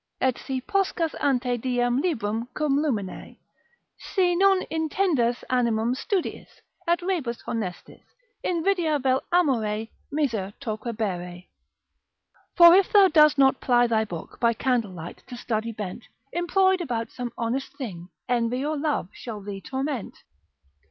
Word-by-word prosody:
———et 260 -2 +2
si 265 -1 -4
Poscas 350 +1 0
ante 250 -3 +1
diem 245 +1 +1
librum 230 - -1
cum 290 -2 +1
lumine, 215 -11 -3 0.6
si 360 -3 +1
non 385 +1 +4
Intendas 315 -6 +1
animum 235 -2 +2
studiis, 360 +7 -2 0.4
et 345 +1 +3
rebus 315 -11 -2
honestis, 200 -7 -5 0.4
Invidia 340 -3 +1
vel 260 0 +2
amore 225 -11 +1 0.2
miser 230 -10 -1
torquebere.——— 215 -7 -4 1.1
For 345 -1 +9
if 380 +1 +4
thou 400 -2 +7
dost 305 -2 +5
not 270 -1 +4
ply 245 -1 +4
thy 225 -2 +2
book, 175 -6 -8
By 235 -1 +3
candlelight 210 -10 -2
to 245 - -8
study 230 -1 -2
bent, 210 0 -6 0.3
Employ'd 375 +2 +2
about 230 -7 -3
some 245 -2 -5
honest 245 +4 -2
thing, 180 - -7 0.2
Envy 245 +2 0
or 305 0 -1
love 290 - -1
shall 225 -4 -7
thee 195 -1 -7
torment. 265 -2 -4
250 Hz, 130 wpm, -25 LUFS, 225-315 Hz, 1.1 s, For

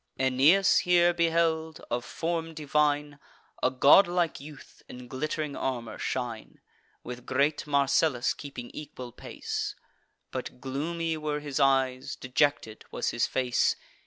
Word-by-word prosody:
Aeneas 135 +9 +4
here 175 -1 +4
beheld, 165 -1 +1
of 120 0 -1
form 165 -1 -3
divine, 145 -1 0 0.4
A - - +3
godlike 170 +6 +4
youth 145 0 -13
in 125 0 -10
glitt'ring 150 +3 -3
armour 120 -4 -3
shine, 120 -4 -4 0.4
With 125 0 -8
great 145 +2 +1
Marcellus 140 -2 +2
keeping 125 -4 -8
equal 130 -4 -8
pace; - - -5 0.6
But - - -6
gloomy 160 +5 -2
were 150 -1 -2
his 145 -2 -4
eyes, 135 -2 +2
dejected 130 -4 0
was - - -2
his 120 - 0
face. 125 -2 +1
145 Hz, 120 wpm, -28 LUFS, 130-160 Hz, 0.6 s, Aeneas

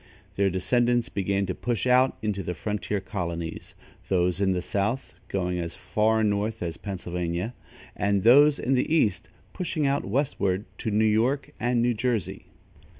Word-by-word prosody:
Their 100 0 +2
descendants 120 +6 +1
began 100 0 0
to 95 - -2
push 120 +4 -2
out 125 +1 +4
into 105 -2 -1
the 90 0 -4
frontier 105 +2 -2
colonies, 85 -4 -5 0.3
those 90 0 +1
in 95 -1 +3
the 90 -1 0
south 105 +8 -2
going 90 -2 -1
as 85 0 -4
far 110 +1 +1
north 105 0 0
as 85 -2 -3
Pennsylvania, 90 +2 -4 0.4
and 100 -1 +1
those 145 +5 +7
in 135 - 0
the 130 +3 +1
east 110 - +2 0.2
pushing 165 -4 -2
out 140 +1 +1
westward 100 -5 0
to 110 - -2
New 110 +1 +2
York 130 +6 +1
and 120 -1 +1
New 120 0 +2
Jersey. 105 -5 -2
105 Hz, 155 wpm, -26 LUFS, 95-120 Hz, 0.4 s, those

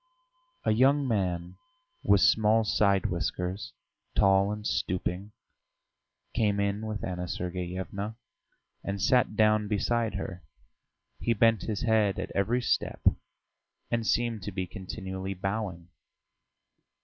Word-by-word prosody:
A - - +3
young 135 +5 +4
man 90 -6 -1 0.4
with 100 -1 +4
small 110 +1 +4
side 100 -2 +2
whiskers, 90 +1 -2 0.4
tall 100 +1 +4
and 105 0 -5
stooping, 95 +1 -2 1.0
came 105 -3 +1
in 100 +2 -1
with 105 -1 -4
Anna 90 -1 -3
Sergeyevna 90 +4 -4 0.7
and 100 0 -3
sat 115 +2 +3
down 110 0 +3
beside 110 +2 0
her; 95 -2 -5 0.8
he 115 - +1
bent 115 -1 +4
his 105 +3 -3
head 110 -4 +2
at - - -4
every 115 +6 +1
step - - -1 0.9
and 115 -1 0
seemed 115 -3 +1
to 105 - -5
be 95 -1 -2
continually 95 0 -6
bowing. 95 -3 -3
100 Hz, 115 wpm, -29 LUFS, 95-110 Hz, 1.0 s, young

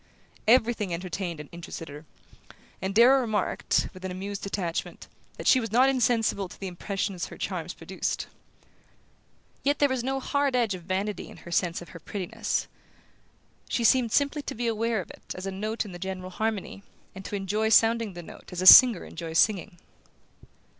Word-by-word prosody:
Everything 225 -4 +3
entertained 175 -1 -4
and 150 - -8
interested 170 -1 -8
her, 150 +2 -10 0.8
and 190 +2 -3
Darrow 255 +4 +6
remarked, 220 -5 0
with 185 - -13
an 190 - -3
amused 195 +2 -5
detachment, 185 -4 -4 0.3
that - - -7
she 260 - +6
was 225 -4 -4
not 255 +4 +5
insensible 225 -6 +1
to - - -13
the 195 - -6
impression 195 +2 -3
her - - -10
charms - - -4
produced. - - -3 1.4
Yet 285 +1 +1
there 285 - +4
was 260 -2 -1
no 270 +1 -1
hard 280 0 0
edge 235 -5 +2
of 185 - -7
vanity 195 +4 -3
in - - -13
her 170 - -9
sense 170 0 0
of - - -15
her 165 - -10
prettiness: 185 +2 -3 1.0
she 240 - -1
seemed 240 0 +4
simply 285 +3 +1
to - - -6
be 240 +1 -3
aware 225 -1 0
of - - -11
it - - -15
as 185 - -6
a 195 - -3
note 215 +4 -3
in 205 - -9
the 175 - -9
general 185 0 -5
harmony, 215 -1 -3 0.3
and 190 - -9
to - - -4
enjoy 205 +3 -1
sounding 225 -1 +4
the 175 0 -8
note - - -13
as 180 0 -3
a - - -2
singer 235 0 +9
enjoys 165 -1 -5
singing. 195 -3 +2
205 Hz, 180 wpm, -27 LUFS, 185-230 Hz, 1.4 s, singer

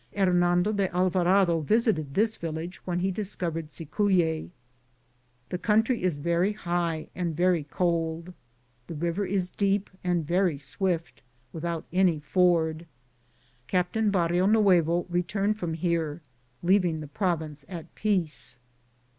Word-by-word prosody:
Hernando 180 0 +3
de 200 -3 0
Alva 185 0 +2
rado 175 -3 +3
visited 165 - +1
this 220 +2 +2
village 165 +2 -5
when 175 -1 -1
he 190 +1 +1
discovered. 175 -5 -3
Cicuye. 165 +1 0 1.0
The 180 - -3
country 225 +4 +2
is 180 -3 +1
very 170 +6 +1
high 170 -5 -2
and 170 -3 -2
very 175 -3 +2
cold. 170 +1 -1 0.5
The 165 - -6
river 170 +5 -1
is 185 -2 -1
deep 200 0 0
and 175 -3 0
very 175 -1 +1
swift, 165 - -3 0.3
without 165 0 -3
any 180 -4 +3
ford. 165 0 +1 0.8
Captain 195 +4 +1
Barrionuevo 180 -1 +3
re 175 0 +1
turned 205 +4 -1
from 165 -4 -2
here, 165 -2 -1 0.4
leaving 180 -2 +3
the 155 - -7
province 155 -4 -2
at. 170 -3 -8
peace. 180 -11 -1
175 Hz, 125 wpm, -27 LUFS, 165-190 Hz, 1.0 s, Hernando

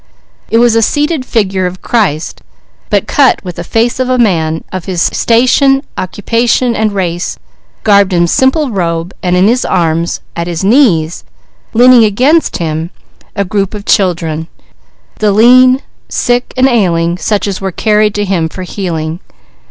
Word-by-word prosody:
It 225 - +2
was 235 0 +4
a 225 - +3
seated 295 +2 -1
figure 195 -5 0
of 180 +1 -9
Christ, 190 -10 -1 0.5
but - - +1
cut 275 -3 +2
with 180 -2 -7
the 170 - -4
face 230 +7 -1
of 255 0 -1
a 255 - +1
man 160 -8 0
of 185 -2 -5
his 185 -3 -3
station, 255 +8 +2
occupation, 235 +5 -1
and 215 0 0
race, 180 -3 -3 0.5
garbed 200 -2 +3
in 175 -1 +2
simple 265 - +1
robe, 170 -2 -2
and 180 -1 0
in 185 +2 +4
his 245 +3 +1
arms, 170 -2 -1
at 170 0 -3
his 170 -1 -4
knees, 190 - +2 0.5
leaning 245 0 +6
against 255 +10 +2
him, 160 0 -3 0.5
a 200 -1 -1
group 195 +2 -2
of 205 -1 -8
children: 165 -5 0 0.7
the 210 -1 +2
lean, 255 +5 +5 0.3
sick 245 0 -1
and 260 +1 +4
ailing, 175 -8 0
such 210 0 -1
as 195 -1 -4
were 190 0 -3
carried 210 +2 +1
to 205 0 -1
him 175 -5 -1
for 185 - -8
healing. 170 -4 -4
200 Hz, 160 wpm, -11 LUFS, 175-240 Hz, 0.7 s, leaning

